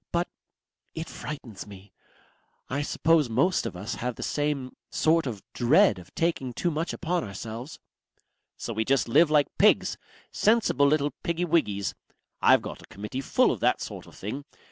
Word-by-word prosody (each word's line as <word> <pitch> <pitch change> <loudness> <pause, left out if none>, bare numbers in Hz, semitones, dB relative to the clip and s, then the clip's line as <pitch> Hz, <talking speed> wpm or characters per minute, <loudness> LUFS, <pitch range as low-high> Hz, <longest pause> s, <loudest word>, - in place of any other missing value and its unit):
But... 175 +1 +1 0.7
it 160 0 -4
frightens 120 -10 -7
me. 100 -1 -13 0.8
I 140 +2 0
suppose 155 -1 +2
most 135 +12 +2
of 90 - -7
us 100 +6 -4
have 125 0 -2
this - - -4
same 145 -3 -2
sort 160 -1 +2
of 105 -6 -5
dread 120 -5 +4
of 90 - -15
taking 160 -7 0
too 175 +8 0
much 160 +3 -2
upon 175 0 -1
ourselves." 115 +6 -7 0.8
"So 115 - -4
we 110 +1 0
just 135 +2 +2
live 150 +7 +5
like 150 -2 +2
pigs. - - +4 0.3
Sensible 215 -10 +3
little 145 0 +2
piggywiggys. 165 - 0 0.5
I've - - +6
got - - -7
a - - -13
Committee 105 +7 -5
full - - +3
of - - -3
that - - +2
sort - - -7
of - - -15
thing. 110 +9 -5
140 Hz, 165 wpm, -27 LUFS, 110-160 Hz, 0.8 s, I've